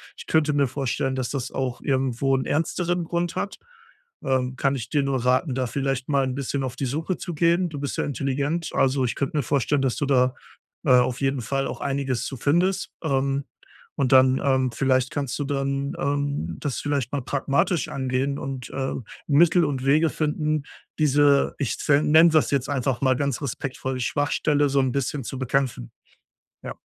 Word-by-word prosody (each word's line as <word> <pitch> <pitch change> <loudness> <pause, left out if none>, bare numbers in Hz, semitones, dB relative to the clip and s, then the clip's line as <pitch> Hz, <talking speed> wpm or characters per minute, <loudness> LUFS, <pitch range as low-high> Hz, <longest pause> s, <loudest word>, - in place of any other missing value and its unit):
Ich - - -11
könnte 155 -2 +2
mir 140 -1 +2
vorstellen, 135 0 -2
dass 130 -2 -2
das 135 -4 -4
auch 130 -2 -3
irgendwo 135 0 +1
'n 130 - -2
ernsteren 175 +3 0
Grund 170 +1 -2
hat. 200 - -3 0.7
Äh, 130 -2 0
kann 135 +1 +1
ich 120 -2 -5
dir 145 -2 +1
nur 135 -3 -1
raten, 130 +2 +2
da 130 -1 -1
vielleicht 135 +1 -2
mal 140 -2 +3
'n 130 0 -3
bisschen 140 0 -2
auf 130 -2 -4
die 135 - -3
Suche 160 +8 -2
zu 175 - -5
gehen. 170 +3 +2
Du 150 -3 -6
bist 140 -1 -4
ja - - +1
intelligent, 145 +4 -2
also, 135 0 +2
ich 120 - -2
könnte 140 +2 -2
mir 145 - +1
vorstellen, 140 +3 +1
dass 135 -3 0
du 145 - 0
da, 130 -1 +2 0.5
äh, - - +1
auf 125 0 +4
jeden 135 -1 0
Fall 135 +4 -1
auch - - -6
einiges 135 -3 -1
zu 135 - -5
findest, 175 +9 +1
ähm, 140 -2 0 0.5
und 135 -3 0
dann 130 0 +5
ähm, 130 -2 +2
vielleicht 130 +1 +1
kannst 140 -3 -3
du - - 0
dann, 140 0 -1
ähm, 140 - -1
das 140 -3 -3
vielleicht 140 -4 -1
mal 145 - -1
pragmatisch 145 +7 0
angehen 135 +1 -1
und, 135 -3 -6
äh, 135 0 -2 0.3
Mittel 165 +3 +5
und 135 -3 -2
Wege 155 +3 +4
finden, 155 -1 -1 0.4
diese 145 -1 +4
ich 140 - -2
zen 150 +1 +2
nenne 160 +2 +8
das 155 -1 +3
jetzt 140 -1 0
einfach 130 -2 -1
mal 130 -1 +3
ganz 140 -2 -1
respektvoll 130 -1 -4
die - - -1
„Schwachstelle” 145 +1 +1
so 140 0 +2
'n 130 -1 0
bisschen 140 0 -2
zu 135 - -5
bekämpfen. 130 - -1 0.7
Ja. - - -6
140 Hz, 190 wpm, -24 LUFS, 130-145 Hz, 0.7 s, nenne